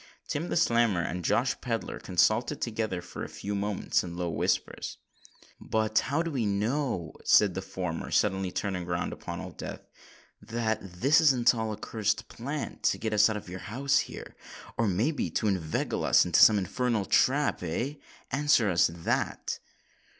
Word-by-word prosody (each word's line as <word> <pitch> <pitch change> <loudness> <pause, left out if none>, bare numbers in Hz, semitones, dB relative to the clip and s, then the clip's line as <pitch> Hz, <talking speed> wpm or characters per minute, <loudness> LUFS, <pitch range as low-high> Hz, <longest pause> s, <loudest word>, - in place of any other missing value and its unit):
Tim 165 +4 -3
the - - -1
Snammer 115 - +2
and 90 0 -4
Josh - - +2
Pedler - - -3
consulted - - +1
together 110 -6 -2
for 90 - -7
a - - -6
few 105 - -5
moments 100 0 0
in 85 -1 -7
low 90 -1 -2
whispers. 75 - -1 0.6
"But 110 0 +1
how 150 +4 +1
do 165 - -3
we 130 -5 -1
know," 105 - -1
said 100 -3 +5
the 95 - -3
former, 90 -3 -4
suddenly 95 -2 +1
turning 90 -3 -3
round 85 0 -2
upon - - -6
Old - - -8
Death, - - -6 0.6
"that 110 +1 -2 0.2
this 145 +4 +5
isn't 130 -6 +5
all 110 -2 -2
a 105 - -5
cursed 110 -1 -2
plant 140 +5 -5
to - - +2
get 110 -1 -3
us 105 +1 +5
out 110 - -2
of 105 - -8
the 90 +1 -7
house 135 +8 +1
here—or 115 - -6
may 105 - +1
be 150 - -2
to - - -2
inveigle 90 -6 -1
us - - +5
into 85 -1 +3
some 110 - +8
infernal 110 +2 0
trap—eh? 135 - +1 0.3
Answer 140 -6 +3
us 85 -1 +4
that." 85 -1 -2
105 Hz, 165 wpm, -28 LUFS, 95-125 Hz, 0.6 s, some